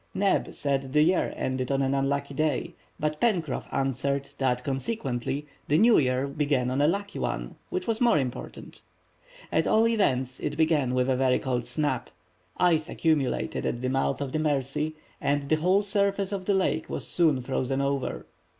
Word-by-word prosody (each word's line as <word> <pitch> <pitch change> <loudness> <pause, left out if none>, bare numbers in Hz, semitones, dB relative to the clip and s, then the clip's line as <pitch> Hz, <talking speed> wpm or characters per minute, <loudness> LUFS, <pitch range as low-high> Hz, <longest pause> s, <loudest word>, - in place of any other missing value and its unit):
Neb 195 0 +1
said 135 -2 -1
the 150 0 +5
year 180 +4 +2
ended 130 0 -2
on 135 0 +2
an 135 0 +1
unlucky 140 +1 -1
day, 150 -1 -1 0.3
but 150 0 -2
Pencroff 175 - 0
answered 135 +1 -1
that 125 -2 +1
consequently 135 - -2 0.2
the 150 - +3
new 225 +5 +6
year 130 -1 +1
began 140 -3 0
on 135 +2 +1
a 145 - +4
lucky 200 +4 -2
one, - - -3 0.2
which 185 - -3
was 225 0 -1
more 240 -2 +5
important. 130 -4 -5 0.7
At - - +2
all 225 +1 +4
events, 130 - +1
it - - -3
began 155 -6 +2
with 125 0 +2
a 130 - +2
very 130 0 +3
cold 125 -3 -2
snap. 150 -2 -2 0.5
Ice 165 -3 +2
accumulated 155 -5 0
at 120 - -1
the 130 - 0
mouth 135 +1 0
of 140 -2 -3
the 155 - -1
Mercy, 150 +1 -1 0.3
and 145 0 +1
the 155 +3 +1
whole 185 +6 +3
surface 200 -1 +1
of 195 -2 -3
the 200 - +2
lake 185 -4 0
was - - -4
soon 160 -6 +2
frozen 130 +1 -1
over. 140 -1 -2
140 Hz, 175 wpm, -27 LUFS, 130-165 Hz, 0.7 s, new